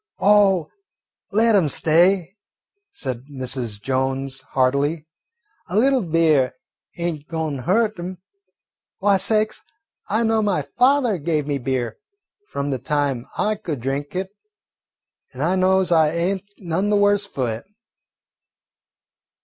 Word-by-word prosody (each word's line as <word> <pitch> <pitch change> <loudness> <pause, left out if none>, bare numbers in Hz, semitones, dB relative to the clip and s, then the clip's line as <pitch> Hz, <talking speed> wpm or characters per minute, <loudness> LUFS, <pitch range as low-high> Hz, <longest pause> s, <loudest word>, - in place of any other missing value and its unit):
"Oh, 195 -4 +4 0.6
let 225 +2 +3
'em 175 -7 +3
stay," 175 +5 +3 0.6
said 130 - -5
Mrs. 125 -5 -2
Jones 135 +2 -2
heartily; 140 +4 0 0.6
"a 185 - -1
little 265 +3 +4
beer 160 - +2 0.4
ain't 170 -4 -3
goin' 160 -3 -3
to - - -7
hurt 215 - +1
'em. 180 +2 -6 0.8
Why, 200 0 +3
sakes, 215 +3 +1 0.5
I 220 +3 +1
know 225 -1 +2
my 195 -8 0
father 250 - +2
gave 155 -1 -1
me 145 -1 -2
beer 125 -3 -2 0.5
from 140 0 -3
the 130 - -2
time 140 -4 -1
I 215 +1 +1
could 175 - -5
drink 135 +6 -3
it, 190 +1 -3 1.0
and 130 +2 -4
I 175 +4 +2
knows 185 -1 +2
I 160 -2 +5
ain't 185 +4 -2
none 185 +2 -1
the 210 - +3
worse 205 0 +3
fu' 135 -9 -4
it." 115 -1 -4
165 Hz, 130 wpm, -22 LUFS, 140-200 Hz, 1.0 s, I